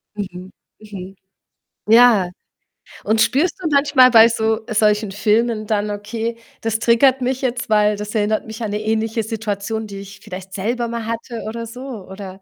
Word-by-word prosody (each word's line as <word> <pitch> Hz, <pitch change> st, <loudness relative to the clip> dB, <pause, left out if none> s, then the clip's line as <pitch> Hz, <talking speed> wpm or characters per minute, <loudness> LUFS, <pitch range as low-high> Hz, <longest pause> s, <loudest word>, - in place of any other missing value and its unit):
Mhm. 185 Hz, -2 st, -7 dB, 0.3 s
Mhm. 195 Hz, -3 st, -9 dB, 0.7 s
Ja. 225 Hz, -5 st, +6 dB, 0.7 s
Und 220 Hz, +2 st, +1 dB
spürst 280 Hz, +9 st, +2 dB
du 345 Hz, -, -1 dB
manchmal 280 Hz, -3 st, +5 dB
bei 225 Hz, -1 st, +8 dB
so 220 Hz, -1 st, 0 dB
solchen 210 Hz, -1 st, +2 dB
Filmen 215 Hz, +2 st, +1 dB
dann: 210 Hz, -1 st, 0 dB
„Okay, 225 Hz, +3 st, -4 dB, 0.2 s
das 225 Hz, -1 st, -1 dB
triggert 255 Hz, +3 st, +4 dB
mich 260 Hz, +1 st, -1 dB
jetzt, 245 Hz, -2 st, -2 dB
weil, 210 Hz, -1 st, +3 dB
das 210 Hz, +1 st, -6 dB
erinnert 215 Hz, 0 st, 0 dB
mich 220 Hz, +1 st, -9 dB
an 210 Hz, -, -3 dB
'ne 210 Hz, +1 st, -2 dB
ähnliche 220 Hz, +1 st, -1 dB
Situation, 220 Hz, 0 st, -4 dB
die 200 Hz, -1 st, -8 dB
ich 200 Hz, 0 st, -11 dB
vielleicht 190 Hz, +1 st, -9 dB
selber 235 Hz, +5 st, -2 dB
mal 235 Hz, -1 st, -4 dB
hatte“, 230 Hz, +1 st, -5 dB
oder 230 Hz, +1 st, -5 dB
so? 240 Hz, +3 st, -10 dB, 0.3 s
Oder, 190 Hz, 0 st, -9 dB
220 Hz, 165 wpm, -19 LUFS, 205-235 Hz, 0.7 s, bei